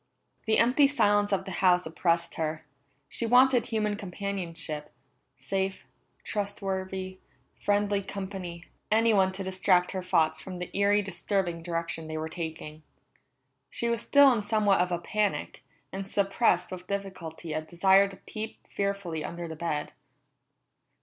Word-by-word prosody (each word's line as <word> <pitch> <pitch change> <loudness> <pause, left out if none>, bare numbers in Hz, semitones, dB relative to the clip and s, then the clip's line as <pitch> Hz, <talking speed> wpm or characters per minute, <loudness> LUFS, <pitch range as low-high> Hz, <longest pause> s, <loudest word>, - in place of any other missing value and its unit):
The 220 - +4
empty 255 +5 +5
silence 205 -7 +3
of 195 - 0
the 195 - -6
house 180 -1 +4
oppressed 170 +1 0
her. 155 -1 -3 0.4
She 230 - -3
wanted 250 0 +5
human 215 -2 0
companionship 180 -6 -4 0.5
safe, 195 0 -2 0.4
trustworthy, 190 -2 -3 0.4
friendly 205 0 +2
company, 190 -3 -6 0.3
anyone 215 -4 +4
to 195 +1 -5
distract 185 -1 +2
her 190 - -3
thoughts 160 -3 +1
from 185 -1 -7
the 180 0 -7
eerie, 205 +1 +3
disturbing 185 -2 -2
direction 165 -1 -3
they 155 0 -4
were 160 0 -3
taking. 160 -2 -6 0.9
She 235 - -2
was 235 -1 0
still 285 0 +6
in 225 - 0
somewhat 205 -2 +2
of 180 0 0
a 175 - +1
panic, 205 +4 -2 0.3
and 195 0 -5
suppressed 195 -3 +2
with 180 0 -7
difficulty 185 -5 -5
a 155 - -1
desire 190 +4 +4
to 195 -1 -11
peep 215 +3 -8
fearfully 200 -6 -2
under 170 0 -5
the 160 - -6
bed. 155 -2 -3
190 Hz, 140 wpm, -28 LUFS, 170-205 Hz, 0.9 s, still